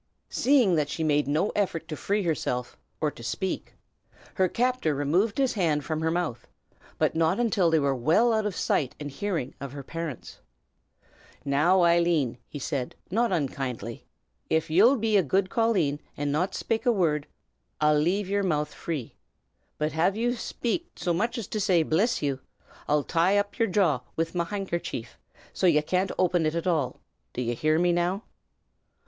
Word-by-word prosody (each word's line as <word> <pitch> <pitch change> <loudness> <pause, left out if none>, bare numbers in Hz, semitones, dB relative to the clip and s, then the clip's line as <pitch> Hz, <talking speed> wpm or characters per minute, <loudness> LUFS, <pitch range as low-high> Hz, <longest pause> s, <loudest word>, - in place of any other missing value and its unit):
Seeing 255 -8 +4
that 150 -1 0
she 160 +2 -3
made 150 -2 +2
no 155 +8 +1
effort 170 -5 -1
to 160 - -4
free 200 +7 -1
herself, 125 -7 -2 0.2
or 150 -1 0
to - - -13
speak, 185 +10 -3 0.6
her 190 -1 +2
captor 245 - 0
removed 175 +10 +1
his 270 -2 +2
hand 155 -8 0
from 155 0 -2
her 160 - +1
mouth; 165 -8 -2 0.5
but - - +2
not 160 +5 +1
until 205 -7 +2
they 160 - +3
were 140 -2 +2
well 165 - +3
out 220 -1 +1
of 200 - -4
sight 135 -5 0
and 145 -1 -5
hearing 165 -3 -3
of 140 -1 -6
her 140 -1 -7
parents. 165 -3 -6 1.1
"Now, 160 +7 +3
Eileen," 170 -7 +2
he - - -8
said, 135 -2 -3 0.2
not 230 +3 +2
unkindly, 130 - -3 0.5
"av 160 0 +1
ye'll 215 - +6
be 220 -3 +2
a - - +5
good 185 +5 0
colleen, 190 -11 +1 0.2
and 145 0 -1
not 180 +6 0
shpake 225 +3 -2
a - - +6
wurrd, 160 -8 +1 0.5
I'll 150 0 +4
lave 185 +6 +1
yer 200 +1 +1
mouth 150 -5 -1
free. 150 -9 -5 0.6
But 155 +1 -2
av 180 +5 +2
ye 235 +2 +1
shpake, 245 +5 -2
so 175 - -1
much 230 +8 -1
as 230 - -3
to 215 - -2
say, 185 -5 +3
'Bliss 195 +7 +1
ye!' 140 -2 -1 0.5
I'll 150 0 +2
tie 180 +6 +2
up 205 0 -1
yer 230 - +3
jaw 180 - +2 0.2
wid 165 0 -1
me 175 - -2
pock' 170 0 -1
handkercher, 170 - -3 0.5
so 185 - +2
as 170 - +5
ye 150 - +4
can't 185 +4 0
open 175 -3 +2
ut 155 - -2
at 170 - -2
all. 155 -8 0 0.3
D' 125 - -3
ye 120 0 -1
hear 155 +6 +1
me, 175 +1 +3
now?" 175 +4 0
170 Hz, 185 wpm, -27 LUFS, 150-200 Hz, 1.1 s, ye'll